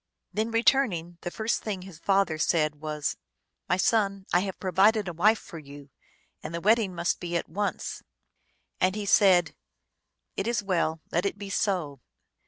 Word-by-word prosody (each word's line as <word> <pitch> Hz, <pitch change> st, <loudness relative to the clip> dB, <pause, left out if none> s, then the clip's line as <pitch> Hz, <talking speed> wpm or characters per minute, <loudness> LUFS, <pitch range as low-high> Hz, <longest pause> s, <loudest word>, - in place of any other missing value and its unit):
Then 215 Hz, +2 st, 0 dB
returning, 225 Hz, -8 st, +1 dB
the 175 Hz, -, -4 dB
first 220 Hz, +5 st, -1 dB
thing 195 Hz, -4 st, -4 dB
his 185 Hz, -4 st, -12 dB
father 195 Hz, -4 st, +1 dB
said 155 Hz, -2 st, +1 dB
was, 150 Hz, -1 st, -3 dB, 0.2 s
" -, -, -53 dB
My 180 Hz, -, +3 dB
son, 195 Hz, -1 st, +1 dB
I 175 Hz, -, +6 dB
have 190 Hz, 0 st, -4 dB
provided 195 Hz, +3 st, +3 dB
a 175 Hz, -, -3 dB
wife 210 Hz, +7 st, +4 dB
for 165 Hz, -, -10 dB
you, 140 Hz, -1 st, -13 dB, 0.5 s
and 170 Hz, -, -6 dB
the -, -, -2 dB
wedding 210 Hz, -1 st, +2 dB
must 170 Hz, 0 st, 0 dB
be 175 Hz, -1 st, -2 dB
at -, -, -4 dB
once." 205 Hz, +5 st, -3 dB, 0.8 s
And 185 Hz, +1 st, +2 dB
he 210 Hz, -1 st, -3 dB
said, 185 Hz, -5 st, +4 dB, 0.4 s
" -, -, -54 dB
It 195 Hz, -, -1 dB
is 235 Hz, -3 st, 0 dB
well. 165 Hz, -4 st, 0 dB
Let 175 Hz, +4 st, +1 dB
it 200 Hz, -, -4 dB
be 200 Hz, -1 st, -7 dB
so." 175 Hz, -10 st, -1 dB
185 Hz, 180 wpm, -27 LUFS, 170-205 Hz, 0.8 s, I